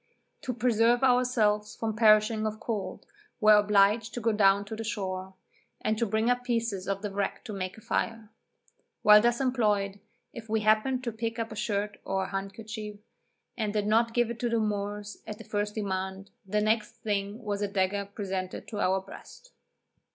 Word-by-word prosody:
To 255 - -3
preserve 235 +1 +3
ourselves 245 -5 +2
from 220 -1 -3
perishing 215 0 +4
of 215 0 -5
cold, 200 -6 -4 0.3
were 215 -2 +7
obliged 210 +2 +3
to - - -2
go 230 0 +1
down 200 -1 +4
to 220 +2 -6
the 225 - -5
shore, 190 -4 -4 0.4
and 215 - 0
to 230 - +1
bring 220 +2 +1
up 245 0 +2
pieces 230 -6 -1
of 195 +1 -2
the 205 - -3
wreck 200 +4 -3
to 220 - -6
make 185 0 -4
a - - -12
fire. 225 0 -2 0.7
While 210 0 +8
thus 240 +1 +2
employed, 210 -7 +1 0.3
if 225 -1 -9
we 220 0 +1
happened 215 +5 +2
to 235 - -2
pick 225 +1 -4
up 230 -1 -3
a - - -6
shirt 210 -1 -2
or 190 0 -1
handkerchief, 210 +2 -6 0.6
and 215 -3 -2
did 210 -1 0
not 230 +2 +2
give 240 -1 +2
it 235 - -7
to 240 - 0
the 230 0 +1
Moors 205 -1 -3
at 210 -1 -6
the - - -10
first 205 0 -2
demand, 190 -1 -3 0.2
the 210 +2 +1
next 215 +1 +1
thing 205 -1 -1
was 205 -1 -2
a 205 - +1
dagger 200 0 0
presented 190 -3 -4
to 210 - -5
our 190 -1 +2
breast. 350 - -13
215 Hz, 185 wpm, -28 LUFS, 200-230 Hz, 0.7 s, While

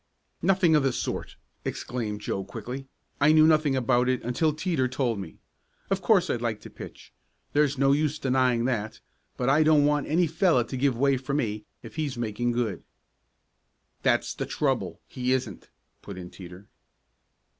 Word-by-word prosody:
"Nothing 185 -4 +4
of 150 - +4
the 135 -2 +1
sort!" - - -4 0.3
exclaimed 110 -4 -4
Joe 95 - -2
quickly. 120 +7 -7 0.3
"I 145 +2 +5
knew 155 0 +7
nothing 155 -3 +3
about 125 0 +2
it 130 -1 0
until 125 +7 +1
Teeter 150 -4 0
told 125 -4 -1
me. 90 -5 -8 0.5
Of 195 0 +1
course 185 -3 +4
I'd 120 - -1
like 115 -3 -2
to - - -11
pitch; - - -11 0.4
there's 145 -1 +2
no 135 +1 +4
use 150 +1 +1
denying 125 -3 +1
that, 110 -3 -2 0.4
but 125 - -1
I 140 +3 +4
don't 155 -2 +5
want 145 -1 +1
any 170 +4 +3
fellow 165 -5 +2
to 130 - -7
give 130 -1 +1
way 140 +1 +3
for 135 +2 -3
me 105 -6 -2 0.2
if 115 - -11
he's 145 -5 -2
making 120 +1 -1
good." 115 -7 -1 1.2
"That's - - +1
the - - -4
trouble - - -1
he 125 0 -1
isn't," 120 -7 -3 0.3
put 100 -2 -9
in 90 -1 -8
Teeter. 90 +2 -11
130 Hz, 170 wpm, -27 LUFS, 115-150 Hz, 1.2 s, knew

